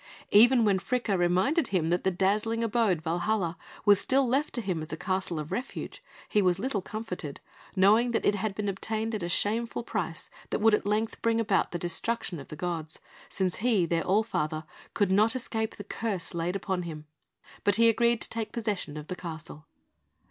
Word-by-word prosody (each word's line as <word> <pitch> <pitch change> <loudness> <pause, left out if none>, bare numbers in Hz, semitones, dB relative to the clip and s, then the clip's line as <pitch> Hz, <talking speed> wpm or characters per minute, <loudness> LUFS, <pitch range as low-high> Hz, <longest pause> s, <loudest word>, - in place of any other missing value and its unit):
Even 235 +3 +7
when 195 -2 +3
Fricka 235 -1 -1
reminded 185 - +2
him 170 -4 0
that 175 - +1
the 190 - +3
dazzling 210 +5 +1
abode, 215 -7 +1
Valhalla, 175 +1 0 0.3
was 205 -2 +6
still 270 0 +2
left 275 +5 +1
to 240 - 0
him 185 -6 -2
as 155 - -7
a 155 - -3
Castle 185 -1 -1
of 150 0 -5
Refuge, 250 - -5 0.2
he 210 - +2
was 180 -2 +3
little 215 -1 -1
comforted, 180 -8 -6 0.4
knowing 210 +6 +5
that 235 - 0
it - - +4
had 205 0 -2
been 210 0 -2
obtained 220 +3 -2
at 215 - -2
a 175 - -3
shameful 225 +6 0
price 180 -8 -3 0.2
that - - 0
would 220 0 +4
at 210 - +1
length 215 +2 -1
bring 230 0 +2
about 210 -3 +2
the 175 - -2
destruction 175 +1 -2
of 135 - -10
the - - -8
gods, 165 -1 -3 0.3
since 185 -2 -1
he, 215 -6 +2
their 165 0 0
All 195 +7 +2
Father, 155 -7 -2 0.3
could 205 -3 +2
not 215 +5 +4
escape 220 -3 -2
the 205 - -8
curse 205 -3 -3
laid 170 +2 -2
upon 190 -2 -2
him; 155 -3 -7 0.6
but 205 -1 +3
he 230 0 +5
agreed 235 +1 +3
to - - -2
take 225 -1 -4
possession 205 -10 -3
of 150 - -6
the 180 - -5
castle. 160 -3 -7
200 Hz, 200 wpm, -28 LUFS, 175-225 Hz, 0.6 s, Even